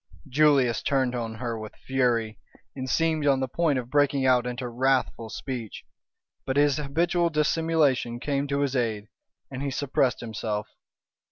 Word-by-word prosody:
Julius 135 -4 +3
turned 130 -3 +1
on 115 -2 -3
her 115 -1 -4
with 110 -1 -8
fury, 120 -4 0 0.4
and 130 -1 -5
seemed 160 -1 +1
on 135 -1 +4
the 130 - -1
point 155 +1 +1
of 125 -1 -5
breaking 145 -2 +2
out 125 -1 +3
into 125 0 -4
wrathful 125 -2 0
speech. 120 -3 -6 0.6
But 130 +1 -2
his 145 -1 +4
habitual 170 +4 +1
dissimulation 150 -6 +1
came 140 +1 -1
to 140 0 -1
his 140 -1 0
aid, 110 -4 -1 0.4
and 130 0 -5
he 140 - -1
suppressed 135 -1 0
himself. 110 -2 -4
130 Hz, 155 wpm, -26 LUFS, 120-145 Hz, 0.6 s, on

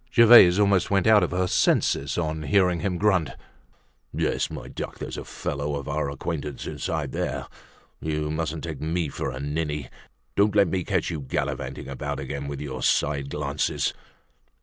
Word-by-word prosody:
Gervaise 115 -7 +8
almost 100 -3 +3
went 95 -2 +2
out 110 -1 +6
of 90 - +1
her 90 +1 0
senses 70 -5 +1
on 80 -2 -1
hearing 90 +3 +2
him 90 +2 -1
grunt: 95 -6 +2 0.8
"Yes, - - 0
my - - -7
duck, - - -6
there's - - -6
a - - -4
young - - -8
fellow 70 +1 -3
of 70 -1 -5
our 70 0 -1
acquaintance 75 0 -4
inside - - -3
there! - - -3 0.5
You 75 -1 -2
mustn't 80 0 -3
take 80 -2 -5
me 80 0 -1
for - - -3
a 65 0 -6
ninny. 75 -1 -3 0.5
Don't 105 0 +3
let 100 -4 +5
me 90 +1 -1
catch - - -1
you 80 - -3
gallivanting 65 +1 -3
about 70 +1 -4
again 70 +1 -5
with 70 -1 -5
your 65 -3 -5
side 70 +2 +1
glances!" 75 0 -1
75 Hz, 170 wpm, -25 LUFS, 70-90 Hz, 0.8 s, Gervaise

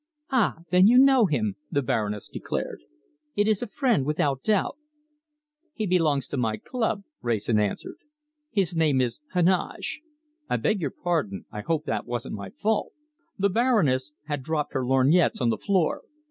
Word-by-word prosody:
"Ah, 245 -7 +2 0.2
then, 185 +2 +6
you 240 +3 +6
know 265 -4 +6
him," 110 - -1
the 140 - 0
Baroness 105 -5 -2
declared. - - -4 0.5
"It 205 +1 +2
is 215 -2 +2
a 245 - -3
friend, 240 - +1
without 140 -2 0
doubt." 210 +2 +1 1.0
"He 215 - -2
belongs 160 -8 +2
to 145 - -3
my 110 -3 0
club," 225 - -2 0.2
Wrayson 110 -1 +1
answered. 105 -2 -2 0.5
"His 195 - 0
name 155 -5 +3
is 125 +1 -1
Heneage. 180 - +1 0.5
I - - +1
beg 215 -3 0
your 145 - 0
pardon! 135 - -2
I 105 - -5
hope 155 +4 -1
that 110 0 -2
wasn't 120 -1 -4
my 100 -2 -6
fault." 215 0 -1 0.4
The 200 0 +2
Baroness 180 - +2
had 145 -2 -3
dropped 150 +2 -2
her 130 - 0
lorgnettes 135 +7 +3
on 120 - +2
the - - -1
floor. 190 -5 +1
155 Hz, 160 wpm, -26 LUFS, 125-200 Hz, 1.0 s, then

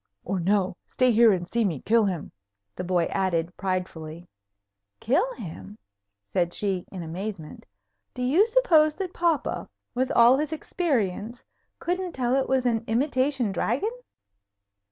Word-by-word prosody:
"Or 190 +1 -1
no. 185 0 +1
Stay 255 -1 +2
here 230 0 +6
and 175 -3 -1
see 235 +4 0
me 170 -9 -1
kill 225 - +3
him," 180 -6 -3 0.4
the 180 - -4
boy 180 -1 +1
added, 175 -2 0
pridefully. 175 -3 -4 0.7
"Kill 355 - +1
him!" 105 - -9 0.6
said 175 -1 +1
she, 195 -3 -1
in 185 -3 -6
amazement. 170 0 -7 0.5
"Do 250 - -3
you 295 +11 +4
suppose 335 -11 +4
that 375 -2 -4
papa, 335 -4 0 0.2
with 255 +1 0
all 240 +3 +6
his 300 0 -2
experience, 240 - -2 0.3
couldn't 360 0 -2
tell 250 0 0
it 270 -1 0
was 260 -1 +2
an 230 -2 +1
imitation 260 -1 +1
dragon? 275 - -1
225 Hz, 140 wpm, -26 LUFS, 180-275 Hz, 0.7 s, here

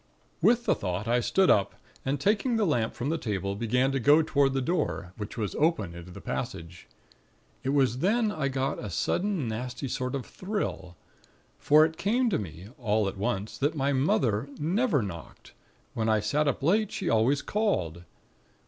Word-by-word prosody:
"With 240 0 +4
the - - +4
thought, 90 +2 -3
I 120 +1 +3
stood 190 +10 +3
up, 100 -1 +2 0.3
and 135 +1 -1
taking 215 - +1
the 220 -2 +2
lamp 120 -10 0
from 130 +3 -3
the 165 +1 -1
table, 100 -4 -2
began 125 +5 +1
to 135 - 0
go 145 +6 +5
toward 140 -3 +2
the 135 - +1
door, 145 - -2
which 105 +2 -7
was 105 -3 -2
open 150 - +1
into 85 +1 -10
the 90 - -10
passage. 80 -4 -6 0.8
It 130 - -1
was 135 -3 +2
then 215 - +2
I 155 -7 -1
got 135 0 -1
a 105 - -4
sudden 175 - -1
nasty 125 +4 -4
sort 125 +1 -2
of 135 - -4
thrill; 185 - -4 0.6
for 155 +2 +6
it 160 0 -4
came 235 +4 +1
to - - +1
me, 90 0 -8
all 110 -3 +1
at 95 - -4
once, 100 +1 -3
that 145 +3 +1
my 140 -1 +1
mother 130 -3 +1
never 170 - +1
knocked, 85 -5 -9 0.4
when 110 0 -1
I 110 -1 +3
sat 145 +9 0
up 140 - 0
too - - -2
late; 210 +5 +2
she - - -4
always 120 +6 +2
called. 90 - -1
130 Hz, 185 wpm, -28 LUFS, 105-160 Hz, 0.8 s, for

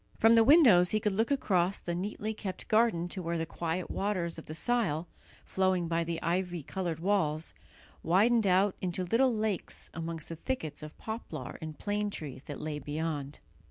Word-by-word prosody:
From 225 +1 +6
the 230 -1 +7
windows 230 - +7
he 215 - +2
could 210 0 0
look 225 +4 +1
across 195 -9 +1
the 175 - -4
neatly 205 +4 -3
kept 190 -4 -6
garden 215 -6 +3
to 185 - -3
where 170 0 -2
the 165 - -1
quiet 170 +2 -3
waters 180 -5 -1
of - - -12
the 155 - -6
Sile, 180 -7 0 0.4
flowing 185 -2 +1
by 165 0 +1
the 165 0 -3
ivy 175 -1 -1
coloured 175 -1 -3
walls, 165 -4 0 0.5
widened 210 +5 +3
out 190 +2 +3
into 185 0 -2
little 240 +8 +3
lakes 215 -4 -2
amongst 165 -1 -5
the 165 - -5
thickets 160 - -4
of 155 0 -9
poplar 220 - -6
and 155 -2 -6
plane 205 0 -1
trees 145 -9 -6
that 145 - -6
lay 150 -1 -4
beyond. 150 -1 -4
180 Hz, 180 wpm, -30 LUFS, 165-210 Hz, 0.5 s, the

